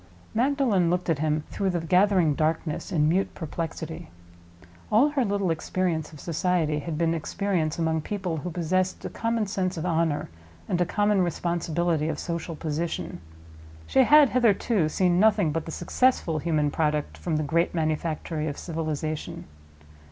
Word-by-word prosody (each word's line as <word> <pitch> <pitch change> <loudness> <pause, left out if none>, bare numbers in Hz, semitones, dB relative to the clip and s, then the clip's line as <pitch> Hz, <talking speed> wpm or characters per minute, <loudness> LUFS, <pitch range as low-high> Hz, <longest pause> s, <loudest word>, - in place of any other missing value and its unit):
Magdalen 235 -7 +2
looked 180 0 0
at 150 - 0
him 155 0 0
through 195 -1 -1
the 175 -2 0
gathering 180 -1 +3
darkness 155 +3 -1
in 150 -4 +2
mute 185 +5 +1
perplexity. 160 0 -5 0.8
All 240 +8 +5
her 285 -3 +1
little 200 -4 0
experience 165 -1 -1
of 155 - -12
society 165 -2 0
had 155 +1 -4
been 165 0 +1
experience 165 -1 -1
among 160 -1 0
people 185 -2 -3
who 165 +4 -4
possessed 185 +2 -1
a - - -4
common 230 -1 -1
sense 185 -2 -2
of 160 - -3
honor, 165 -3 0 0.4
and 180 - 0
a 175 - +2
common 205 0 +2
responsibility 170 -2 0
of 155 - -2
social 170 0 -4
position. 160 - -3 0.6
She 265 - +3
had 290 +1 +7
hitherto 220 -7 +2
seen 180 +1 +2
nothing 205 -6 +4
but 165 +1 -3
the - - -4
successful 175 -3 +1
human 150 -2 +1
product 150 -1 -1
from 165 -3 -3
the 155 - 0
great 170 +4 +1
manufactory 155 0 -2
of 145 - -4
Civilization. 155 -2 -4
170 Hz, 155 wpm, -26 LUFS, 155-190 Hz, 0.8 s, had